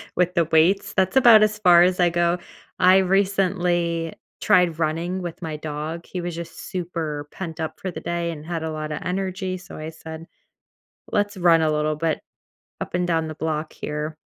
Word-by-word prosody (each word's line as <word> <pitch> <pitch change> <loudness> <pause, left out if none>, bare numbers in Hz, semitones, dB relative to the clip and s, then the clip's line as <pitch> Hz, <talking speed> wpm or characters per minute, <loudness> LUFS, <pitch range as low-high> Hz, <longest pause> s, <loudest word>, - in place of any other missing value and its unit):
with 180 0 +2
the 170 -2 +3
weights, 170 +5 +3
that's 190 +6 +2
about 235 -4 +8
as 215 0 +1
far 175 -4 +7
as 180 0 +2
I 175 - +4
go. 175 +1 +1 0.4
I 185 +1 +6
recently 180 -3 +1 0.3
tried 175 -3 +3
running 170 +4 -1
with 175 0 -6
my 160 -2 -4
dog, 155 +2 -5
he 180 - -5
was 175 -1 -4
just 170 0 -8
super 165 -5 -4
pent-up 160 -3 -5
for 190 - -4
the - - -7
day 170 0 -2
and 155 -2 -9
had 165 -1 -3
a 160 - -3
lotta 155 -1 -5
energy, 185 0 -2
so 185 - -11
I 155 +1 -5
said, 160 0 -9 0.9
"Let's 205 0 0
run 170 -2 +5
a 155 - +2
little 150 0 0
bit 160 +1 -1 0.6
up - - -5
and 180 0 +1
down 165 -2 0
the 155 - -6
block 155 0 -3
here." 150 +1 -5
170 Hz, 185 wpm, -23 LUFS, 160-185 Hz, 0.9 s, about